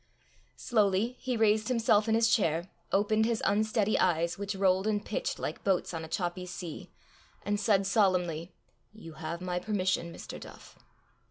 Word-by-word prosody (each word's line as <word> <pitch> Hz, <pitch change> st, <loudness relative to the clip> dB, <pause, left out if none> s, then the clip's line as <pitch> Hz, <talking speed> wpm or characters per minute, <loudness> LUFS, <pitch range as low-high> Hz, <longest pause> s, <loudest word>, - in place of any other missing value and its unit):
Slowly 215 Hz, +1 st, +1 dB
he 255 Hz, -2 st, -2 dB
raised 215 Hz, -1 st, +3 dB
himself 225 Hz, -3 st, +2 dB
in 220 Hz, -, +3 dB
his 225 Hz, 0 st, +4 dB
chair, 170 Hz, -4 st, +1 dB, 0.2 s
opened 215 Hz, +2 st, +2 dB
his 230 Hz, -1 st, -1 dB
unsteady 215 Hz, +1 st, +2 dB
eyes, 170 Hz, -1 st, +2 dB
which 200 Hz, 0 st, -4 dB
rolled 190 Hz, +1 st, +2 dB
and 210 Hz, -1 st, 0 dB
pitched -, -, -2 dB
like -, -, -5 dB
boats 190 Hz, -2 st, 0 dB
on 165 Hz, -1 st, -4 dB
a -, -, -7 dB
choppy 180 Hz, +2 st, -3 dB
sea, 175 Hz, -3 st, -7 dB, 0.6 s
and 205 Hz, +1 st, 0 dB
said 200 Hz, -2 st, +2 dB
solemnly, 180 Hz, -5 st, +1 dB, 0.4 s
"You 205 Hz, -7 st, -11 dB
have 160 Hz, +2 st, -6 dB
my 180 Hz, -1 st, -2 dB
permission, 185 Hz, -3 st, -1 dB
Mr. -, -, -8 dB
Duff." -, -, -13 dB
195 Hz, 160 wpm, -30 LUFS, 180-215 Hz, 0.6 s, his